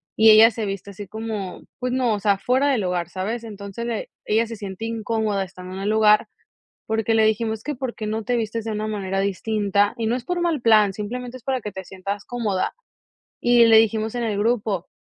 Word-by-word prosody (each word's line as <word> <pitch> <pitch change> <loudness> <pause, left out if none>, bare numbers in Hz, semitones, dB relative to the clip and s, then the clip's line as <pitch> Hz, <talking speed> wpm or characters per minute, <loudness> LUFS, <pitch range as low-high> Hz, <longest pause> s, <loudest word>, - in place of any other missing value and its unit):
y 220 0 +7
ella 220 +2 +9
se 220 -1 -4
viste 195 0 -5
así 200 +1 -9
como 215 -3 -5 0.2
pues 250 0 -2
no, 250 -3 +1
o 210 - -1
sea, 200 -1 +2
fuera 255 +7 +1
del 255 -6 +2
lugar, 180 -2 -1
¿sabes? 215 +6 -3
Entonces 205 +1 -7
le 235 -2 -3 0.2
ella 225 +2 +2
se 230 - -6
siente 200 0 -6
incómoda 220 -3 -1
estando 185 0 -9
en 195 - -5
el 205 - -1
lugar, 215 -1 +4 0.6
porque 220 0 0
le 220 - +4
dijimos: 220 0 0
"Es - - -20
que 295 - -3
por 255 -1 -4
qué 215 - -5
no 220 +1 -2
te 245 +1 0
vistes 225 -1 -2
de 220 - -2
una 215 0 -2
manera 195 -2 -2
distinta, 205 +1 +1
y 230 - -2
no 235 - +1
es 245 - -5
por 355 -1 -1
mal 330 -6 0
plan, 215 -4 +5
simplemente 245 +5 -5
es 235 - -20
para 260 -2 -1
que 210 - -5
te 190 0 -7
sientas 195 +2 -5
cómoda", 215 -6 -1 0.7
y 240 -1 +6
le 225 -1 +7
dijimos 220 +1 +2
en 240 - -1
el 210 -3 -1
grupo 210 -4 0
220 Hz, 230 wpm, -23 LUFS, 200-230 Hz, 0.7 s, ella